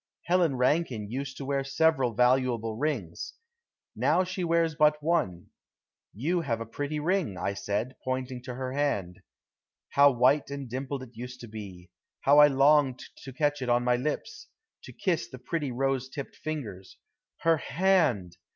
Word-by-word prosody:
Helen 170 -5 +2
Rankine 125 -5 0
used 135 +1 -4
to 140 - -6
wear 140 0 0
several 135 -4 +2
valuable 125 -2 +2
rings. 120 - -3 0.6
Now 185 - +3
she 185 0 -4
wears 165 -1 +2
but 150 0 +4
one. 95 - -1 0.6
"You 165 - -1
have 115 -8 -2
a 115 - -4
pretty 145 +6 -4
ring," 165 - 0
I 100 - -2
said, 105 +6 -3
pointing 130 -1 -3
to 125 -1 -5
her 130 0 -4
hand! 105 -12 -1 0.7
How 140 0 +6
white 130 +3 +3
and 140 -1 -5
dimpled 130 +2 -4
it 125 - -12
used 125 +2 -8
to 120 - -8
be. 100 -5 -10 0.3
How 145 +2 +6
I 150 - +10
longed 140 -1 +3
to 135 - -9
catch 145 +1 0
it 125 - -3
to 120 0 +4
my 125 0 +2
lips, 140 +5 -4 0.4
to - - -10
kiss 160 -1 -1
the 130 - -9
pretty 145 +1 -3
rosy 135 +1 -1
tipped 140 -1 -7
fingers! 110 -12 -6 0.4
Her 165 -1 +4
hand! 145 - +1
135 Hz, 160 wpm, -28 LUFS, 120-150 Hz, 0.7 s, I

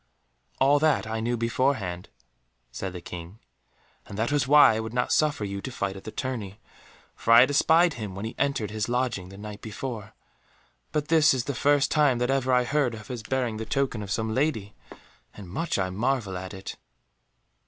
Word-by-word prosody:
"All 140 +2 +4
that 155 -4 +2
I 110 +1 -3
knew 120 +2 -1
beforehand," 115 -6 -1 0.6
said 95 - -5
the 90 -1 -8
King, 85 +3 -9 0.7
"and 100 - -8
that 115 +4 0
was 145 -3 +1
why 145 -4 +7
I 110 - -1
would 110 +1 -5
not 125 0 0
suffer 150 -8 +1
you 100 0 -5
to 130 - -6
fight 100 -5 -3
at 95 - -11
the 110 - -6
tourney, 110 -7 -5 0.6
for 115 - -1
I 115 +1 +10
had 130 - +4
espied 165 +4 +4
him 105 -6 -6
when 100 +3 -5
he 115 - -5
entered 140 -7 0
his 110 +1 -2
lodging 120 -7 -1
the 100 - -11
night 105 0 -8
before. 110 -1 -6 0.8
But 150 -1 -2
this 155 -3 +5
is 125 - -1
the 140 - -3
first 145 +2 +2
time 145 -5 +3
that 125 +2 0
ever 130 -1 +1
I 125 0 +4
heard 130 -2 0
of 110 -1 -11
his 125 -3 -5
bearing 120 0 -2
the 110 - -4
token 135 -5 -1
of 100 - -7
some 110 +1 -1
lady, 110 -7 -1 0.6
and 100 -3 -10
much 165 - -2
I 95 -1 -1
marvel 110 -1 -1
at 95 +2 -6
it." 95 - -8
115 Hz, 200 wpm, -26 LUFS, 105-135 Hz, 0.8 s, I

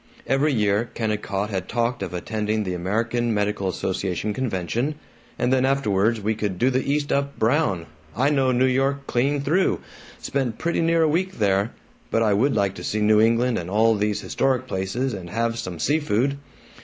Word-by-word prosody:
Every 140 +3 +2
year 105 -1 +1
Kennicott 105 -2 -2
had 95 -2 -3
talked 120 +1 -1
of - - -3
attending 105 +4 -2
the 90 -2 -3
American 115 +6 -1
Medical 105 -1 0
Association 95 +2 -2
convention, 120 - -2 0.4
"and 125 +1 +1
then 130 -1 +3
afterwards 115 -5 +2
we 105 +2 0
could 105 -4 -3
do 125 +7 +2
the 130 +1 +1
East 145 0 0
up 140 0 0
brown. 110 - +1 0.3
I 135 +4 +3
know 135 -3 +2
New 125 +1 +3
York 135 +2 +1
clean 140 +4 +1
through 175 +7 +2 0.4
spent 130 -5 -2
pretty 170 +1 0
near 165 0 +3
a - - +4
week 185 +5 0
there 100 0 +1 0.4
but 115 - +2
I 105 -2 +3
would 130 +8 +2
like 100 -2 +1
to - - -7
see 110 - -1
New 105 0 +4
England 115 +2 +2
and 85 0 -6
all 110 +3 +4
these 105 -1 -1
historic 130 -1 0
places 115 +5 -2
and 90 -4 -7
have 115 +3 -1
some 90 -2 -5
sea 145 - +1
food." 140 0 0
115 Hz, 185 wpm, -23 LUFS, 105-135 Hz, 0.4 s, a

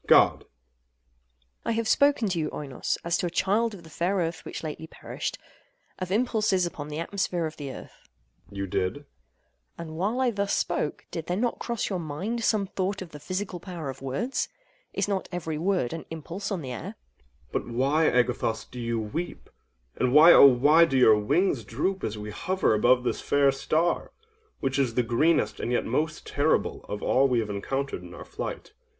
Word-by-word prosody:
God. - - +6
AGATHOS. - - -21 1.2
I - - -1
have 225 0 -1
spoken 280 -3 +4
to 175 -2 -1
you, 155 -1 -1
Oinos, 140 -3 -3
as 170 0 0
to 180 - 0
a - - -2
child 205 +6 +1
of 175 - -13
the 160 - -13
fair 180 +5 0
Earth 170 -3 -1
which - - -7
lately 160 +1 -5
perished—of 185 - -8
impulses 215 -4 +2
upon 150 -4 -5
the 150 0 -5
atmosphere 175 0 -1
of 155 - -5
the 145 -2 -5
Earth. - - -12 0.4
OINOS. 100 - -10
You 100 - -1
did. 90 0 0
AGATHOS. 145 0 -12 0.7
And 160 -2 -7
while 210 +8 0
I 255 -2 +3
thus 200 -2 -1
spoke, 175 -3 -1
did 165 -2 -5
there 180 - -1
not 240 +2 0
cross 235 -3 -2
your 185 - -1
mind 185 +10 -3
some 215 -3 +2
thought 190 0 -2
of 170 - -13
the 150 - -9
physical 185 +4 -4
power 170 -6 -5
of 130 - -13
words? 165 - -2 0.4
Is - - -1
not 195 -2 -2
every 160 -3 -3
word 180 -8 0
an 165 - -6
impulse 165 +6 -5
on 180 -6 -2
the 130 - -5
air? 125 - -5
OINOS. 60 +3 -14
But - - -2
why, 135 +7 +2
Agathos, 120 -2 +1
do 125 - -7
you 115 -1 -1
weep—and 105 - -5
why, 155 +5 +9
oh - - +10
why 145 +6 +6
do 135 -4 0
your 110 -4 +6
wings 135 - +1
droop 170 - -2
as 110 0 -2
we 105 0 -6
hover 185 - +1
above 125 +4 +4
this 125 - -1
fair 140 -1 +3
star—which 175 - -2
is 125 -4 +1
the 125 - +3
greenest 120 +9 +2
and 120 - -2
yet 125 - +1
most 155 +6 -1
terrible 145 +2 0
of 105 - -4
all 135 +2 +4
we 125 -3 +2
have 105 -2 -2
encountered 135 +4 -3
in 90 -1 -11
our - - -9
flight? - - -6
160 Hz, 195 wpm, -27 LUFS, 125-190 Hz, 1.2 s, oh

